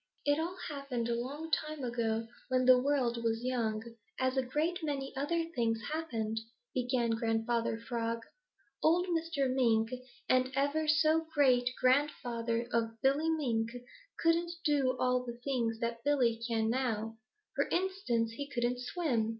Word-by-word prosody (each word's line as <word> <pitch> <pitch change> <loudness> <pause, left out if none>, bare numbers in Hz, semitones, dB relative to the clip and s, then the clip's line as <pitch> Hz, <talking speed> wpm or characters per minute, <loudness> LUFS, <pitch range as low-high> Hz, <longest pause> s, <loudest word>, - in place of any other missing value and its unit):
"It 290 +1 +3
all 345 +3 -3
happened 275 -6 -3
a - - +2
long 285 +7 -5
time 305 -2 -1
ago 230 -2 -1 0.2
when 255 0 +2
the 255 0 +8
world 250 -4 +1
was 225 0 0
young, 225 -4 -1 0.4
as 260 0 +1
a 265 - +3
great 305 +8 -1
many 280 -3 -3
other 315 +5 0
things 230 -4 +1
happened," 225 -9 -2 0.3
began 245 -2 +1
Grandfather 225 0 0
Frog. 230 0 -3 0.6
"Old 340 +3 +4
Mr. 325 -5 0
Mink, 225 -4 +3 0.4
the 255 0 +3
ever 285 +3 +1
so 315 +1 +3
great 255 -4 +4
grandfather 240 -4 +1
of 225 -1 0
Billy 285 +4 +3
Mink, 240 -8 0 0.5
couldn't 340 +1 +2
do 280 -4 +2
all 250 0 +2
the 240 -1 -6
things 235 -5 0
that 235 0 -2
Billy 245 -6 +2
can 225 -2 +1
now. 225 -3 -1 0.4
For - - +1
instance, 350 - 0
he 285 +5 -6
couldn't 245 -1 0
swim. 250 -4 0
255 Hz, 145 wpm, -32 LUFS, 230-290 Hz, 0.6 s, the